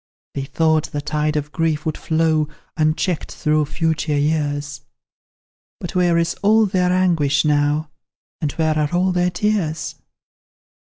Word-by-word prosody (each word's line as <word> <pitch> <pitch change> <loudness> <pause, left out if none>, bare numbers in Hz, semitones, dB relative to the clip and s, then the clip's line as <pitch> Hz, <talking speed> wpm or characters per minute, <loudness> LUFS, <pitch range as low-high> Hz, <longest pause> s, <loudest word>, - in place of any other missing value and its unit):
They 135 -1 -3
thought 155 +2 +1
the 145 - -5
tide 150 +1 -1
of 150 0 -2
grief 160 -2 -1
would 155 - -1
flow 160 -1 +1 0.3
Unchecked 155 +2 0
through 150 0 +1
future 155 0 -1
years; 145 -2 -1 1.0
But 175 - -6
where 175 -2 +3
is 165 0 +1
all 220 +2 +4
their 185 -2 +1
anguish 165 -6 +2
now, 150 +1 +1 0.5
And 150 -3 0
where 155 -1 0
are 150 +3 0
all 185 +1 +2
their 180 0 +1
tears? 180 -5 -1
155 Hz, 140 wpm, -20 LUFS, 150-175 Hz, 1.0 s, all